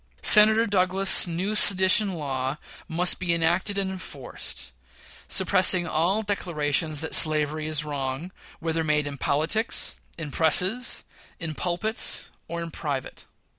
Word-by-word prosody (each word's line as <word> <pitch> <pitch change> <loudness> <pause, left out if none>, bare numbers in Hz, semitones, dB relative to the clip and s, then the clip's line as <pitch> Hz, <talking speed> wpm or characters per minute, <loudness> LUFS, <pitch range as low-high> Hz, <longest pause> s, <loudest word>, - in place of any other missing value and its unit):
Senator 220 +1 +6
Douglas's 190 -1 +3
new 180 +5 -3
sedition 195 0 +5
law 135 -2 -4 0.3
must 175 +3 +2
be 175 -2 0
enacted 175 +5 -1
and 195 -1 0
enforced, 125 - -8 0.6
suppressing 185 -2 +4
all 175 +6 -1
declarations 155 -6 -2
that 160 - -5
slavery 155 -1 +1
is 155 -1 -1
wrong, 140 +3 -5 0.3
whether 165 0 -3
made 150 -1 -1
in 140 -1 -8
politics, 165 +11 -2 0.2
in 160 -4 -7
presses, 185 - 0 0.4
in 165 -2 -5
pulpits; 185 +8 -1 0.2
or 170 0 -5
in 165 - -8
private. 140 -5 -6
170 Hz, 125 wpm, -24 LUFS, 150-190 Hz, 0.6 s, Senator